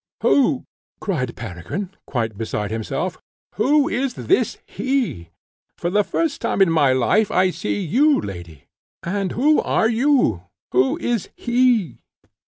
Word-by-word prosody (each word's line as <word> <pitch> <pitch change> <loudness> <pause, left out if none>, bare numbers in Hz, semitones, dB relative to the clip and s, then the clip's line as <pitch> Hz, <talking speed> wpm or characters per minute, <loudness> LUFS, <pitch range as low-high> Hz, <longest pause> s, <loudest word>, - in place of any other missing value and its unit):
"Who," 275 -1 +3 0.3
cried 130 - -2
Peregrine, 115 - -6 0.2
quite 115 -4 -2
beside 105 -1 -3
himself, 110 -1 -3 0.3
"who 285 +8 +3
is 265 -4 -1
this 385 - +1
HE? 255 - -2 0.5
For 175 - -2
the 205 +2 +3
first 315 +6 -2
time - - -1
in 190 -4 +5
my 145 -5 +4
life 130 - +2
I 185 0 +2
see 205 - -3
you, 275 - +3
lady, 85 -6 -8 0.4
and 195 +1 -2
who 300 +6 +3
are 220 - +1
YOU? 235 - +2 0.3
who 130 +1 +2
is 235 -5 -2
this - - -18
HE?" 240 - +2
195 Hz, 140 wpm, -21 LUFS, -, 0.5 s, in